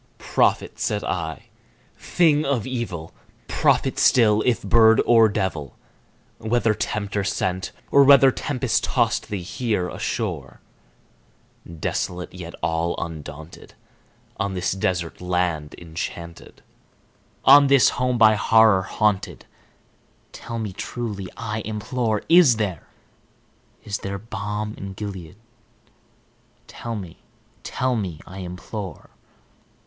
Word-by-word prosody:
"Prophet!" -, -, 0 dB
said 105 Hz, -1 st, -1 dB
I, 80 Hz, -4 st, -4 dB, 0.5 s
"thing 155 Hz, -4 st, +2 dB
of 135 Hz, -7 st, -1 dB
evil! 115 Hz, -11 st, -5 dB, 0.3 s
prophet -, -, +1 dB
still, 110 Hz, -4 st, +4 dB
if 125 Hz, -, +1 dB
bird 110 Hz, +2 st, +5 dB
or 115 Hz, -2 st, +6 dB
devil! 95 Hz, -9 st, -3 dB, 0.6 s
Whether 115 Hz, 0 st, +1 dB
Tempter 105 Hz, -1 st, -2 dB
sent, 95 Hz, 0 st, -2 dB, 0.2 s
or 140 Hz, -, +7 dB
whether 135 Hz, -1 st, +7 dB
tempest 130 Hz, -3 st, -1 dB
tossed 115 Hz, 0 st, 0 dB
thee 100 Hz, -4 st, -4 dB
here 95 Hz, -1 st, -2 dB
ashore, 90 Hz, -, -4 dB, 1.1 s
Desolate 90 Hz, +2 st, -4 dB
yet 85 Hz, -2 st, -8 dB
all 85 Hz, +1 st, 0 dB
undaunted, 80 Hz, -1 st, -8 dB, 0.6 s
on 100 Hz, -1 st, -2 dB
this 90 Hz, -, -1 dB
desert 90 Hz, -3 st, -2 dB
land 90 Hz, -4 st, -1 dB
enchanted 85 Hz, 0 st, -8 dB, 0.8 s
On 140 Hz, +1 st, +8 dB
this 140 Hz, -2 st, +5 dB
home 125 Hz, 0 st, -1 dB
by 110 Hz, -2 st, +6 dB
Horror 110 Hz, -2 st, +4 dB
haunted 105 Hz, +1 st, -1 dB, 0.9 s
tell 115 Hz, 0 st, -7 dB
me 110 Hz, -4 st, -4 dB
truly, 105 Hz, -3 st, -5 dB
I 110 Hz, -1 st, -4 dB
implore 110 Hz, +1 st, -2 dB
Is 165 Hz, -7 st, +6 dB
there 100 Hz, -7 st, -3 dB, 1.0 s
is 100 Hz, -1 st, -4 dB
there 100 Hz, 0 st, -4 dB
balm 105 Hz, 0 st, -5 dB
in 100 Hz, 0 st, -6 dB
Gilead? 95 Hz, -4 st, -7 dB, 1.3 s
tell 115 Hz, -1 st, -6 dB
me 90 Hz, -6 st, -8 dB, 0.4 s
tell 130 Hz, 0 st, -1 dB
me, 95 Hz, -8 st, -4 dB
I 95 Hz, +2 st, -10 dB
implore!" 95 Hz, +2 st, -7 dB
105 Hz, 110 wpm, -23 LUFS, 90-115 Hz, 1.3 s, On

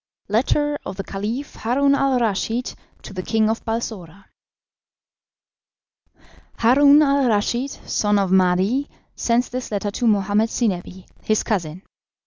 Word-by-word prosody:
"Letter 290 Hz, +7 st, +1 dB
of 190 Hz, -, -7 dB
the 195 Hz, -, -4 dB
Caliph 220 Hz, +10 st, -5 dB
Haroun 275 Hz, +5 st, +2 dB
al 275 Hz, -2 st, +2 dB
Raschid 225 Hz, +2 st, -1 dB, 0.3 s
to -, -, -10 dB
the 185 Hz, -, -4 dB
King 220 Hz, +2 st, +1 dB
of 225 Hz, -, -4 dB
Balsora. 200 Hz, -5 st, -5 dB, 2.3 s
"Haroun 280 Hz, +5 st, +5 dB
al 280 Hz, -2 st, +2 dB
Raschid, 235 Hz, +5 st, 0 dB, 0.2 s
son 210 Hz, -1 st, +1 dB
of 195 Hz, -2 st, 0 dB
Mahdi, 190 Hz, +9 st, +2 dB, 0.3 s
sends 240 Hz, +1 st, 0 dB
this 255 Hz, 0 st, -5 dB
letter 205 Hz, -1 st, -2 dB
to 235 Hz, +3 st, -1 dB
Mohammed 210 Hz, +1 st, +2 dB
Zinebi, 190 Hz, -5 st, -3 dB, 0.2 s
his 215 Hz, -1 st, 0 dB
cousin. 180 Hz, -4 st, -3 dB
220 Hz, 125 wpm, -21 LUFS, 195-255 Hz, 2.3 s, Haroun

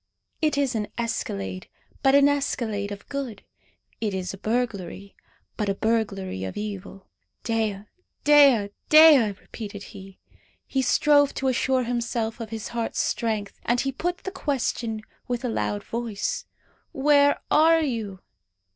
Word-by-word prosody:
It 305 Hz, -2 st, +1 dB
is 280 Hz, -3 st, +1 dB
an 215 Hz, -2 st, -2 dB
escalade, 100 Hz, -, -3 dB, 0.3 s
but 270 Hz, 0 st, +4 dB
an 280 Hz, 0 st, +6 dB
escalade 230 Hz, -8 st, -1 dB
of 200 Hz, 0 st, -8 dB
good. 265 Hz, -8 st, -5 dB, 0.6 s
It 210 Hz, -3 st, -2 dB
is 185 Hz, -1 st, -3 dB
a -, -, -8 dB
burglary, 200 Hz, -4 st, -3 dB, 0.4 s
but 210 Hz, -2 st, -1 dB
a 195 Hz, -, 0 dB
burglary 200 Hz, -, -1 dB
of 95 Hz, -, -5 dB
evil. 200 Hz, -2 st, -6 dB, 0.4 s
"Dea! 220 Hz, -4 st, -1 dB, 0.4 s
Dea! 280 Hz, -8 st, +6 dB, 0.2 s
Dea!" 305 Hz, -8 st, +8 dB
repeated 205 Hz, -3 st, -8 dB
he. 195 Hz, -1 st, -11 dB, 0.5 s
He 265 Hz, -, -1 dB
strove 285 Hz, +2 st, +3 dB
to 265 Hz, -, 0 dB
assure 260 Hz, +1 st, +1 dB
himself 235 Hz, -1 st, -2 dB
of 225 Hz, -2 st, -6 dB
his 220 Hz, -1 st, -5 dB
heart's 235 Hz, -1 st, -3 dB
strength. 215 Hz, -3 st, -2 dB
And 240 Hz, +1 st, +1 dB
he 270 Hz, -, -1 dB
put 350 Hz, +7 st, -3 dB
the 380 Hz, -, -4 dB
question 240 Hz, -, -2 dB, 0.2 s
with 245 Hz, 0 st, -2 dB
a -, -, 0 dB
loud 205 Hz, -2 st, -2 dB
voice 230 Hz, -3 st, -3 dB, 0.5 s
"Where 285 Hz, +1 st, +4 dB
are 325 Hz, +1 st, +5 dB
you?" 220 Hz, -9 st, -3 dB
230 Hz, 140 wpm, -25 LUFS, 205-270 Hz, 0.6 s, Dea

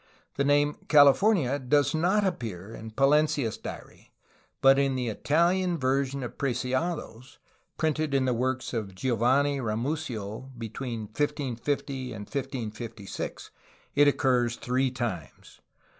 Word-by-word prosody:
The 140 Hz, -, 0 dB
name 145 Hz, +1 st, +2 dB
"California" 145 Hz, -, +5 dB
does 145 Hz, +4 st, +2 dB
not 185 Hz, +6 st, +2 dB
appear 110 Hz, -, -4 dB
in 110 Hz, 0 st, -8 dB
Pa 130 Hz, +5 st, -2 dB
lencia's 145 Hz, -5 st, +2 dB
diary, -, -, -10 dB, 0.5 s
but 135 Hz, 0 st, +6 dB
in 135 Hz, -1 st, +1 dB
the 125 Hz, -2 st, -1 dB
Italian 170 Hz, -, +1 dB
version 135 Hz, 0 st, 0 dB
of 120 Hz, -, -7 dB
Preciado's, 130 Hz, -1 st, -2 dB, 0.4 s
printed 155 Hz, -2 st, 0 dB
in 135 Hz, -1 st, +2 dB
the 125 Hz, -, +2 dB
works 130 Hz, +2 st, -2 dB
of 105 Hz, -5 st, -4 dB
Giovanni 130 Hz, +6 st, +2 dB
Ramusio 115 Hz, -1 st, -3 dB
between 115 Hz, +1 st, -5 dB
1550 130 Hz, +2 st, -2 dB
and 105 Hz, -, -7 dB
1556, 115 Hz, -6 st, -5 dB, 0.4 s
it 145 Hz, 0 st, +5 dB
occurs 125 Hz, -4 st, +2 dB
three 130 Hz, 0 st, 0 dB
times. 120 Hz, -, -6 dB
130 Hz, 120 wpm, -27 LUFS, 115-145 Hz, 0.5 s, but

